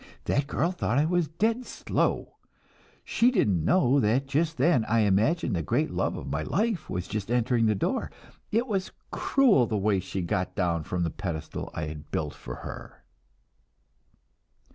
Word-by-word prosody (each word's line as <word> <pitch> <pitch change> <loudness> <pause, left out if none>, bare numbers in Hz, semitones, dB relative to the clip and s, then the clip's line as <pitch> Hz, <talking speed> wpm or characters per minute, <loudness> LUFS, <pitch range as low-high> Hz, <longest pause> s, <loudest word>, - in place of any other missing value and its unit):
That 140 0 +1
girl 165 +4 0
thought 135 -9 -1
I 145 - +4
was 175 -1 +1
dead 220 - 0
slow. - - -2 0.7
She 235 - +3
didn't 105 - +2
know 140 - +4
that 125 +4 +2
just 155 +4 0
then 135 -2 +3
I 115 +1 +2
imagined 110 - +2
the 85 - 0
great 75 - 0
love - - -1
of - - -7
my 75 - -1
life 205 - -1
was 90 0 -3
just 105 -1 -4
entering 120 -1 +2
the 110 - +2
door. 95 - -1 0.4
It 230 +3 +2
was 195 -6 -2 0.2
cruel 230 - +3
the 110 - -1
way 100 -1 +2
she 95 +1 -4
got 90 +2 -2
down 85 -4 0
from 90 -1 -1
the 85 - -1
pedestal 85 -6 -5
I 80 - -2
had 75 -1 -8
built 75 -2 -2
for - - -8
her." - - -9
115 Hz, 170 wpm, -27 LUFS, -, 0.7 s, I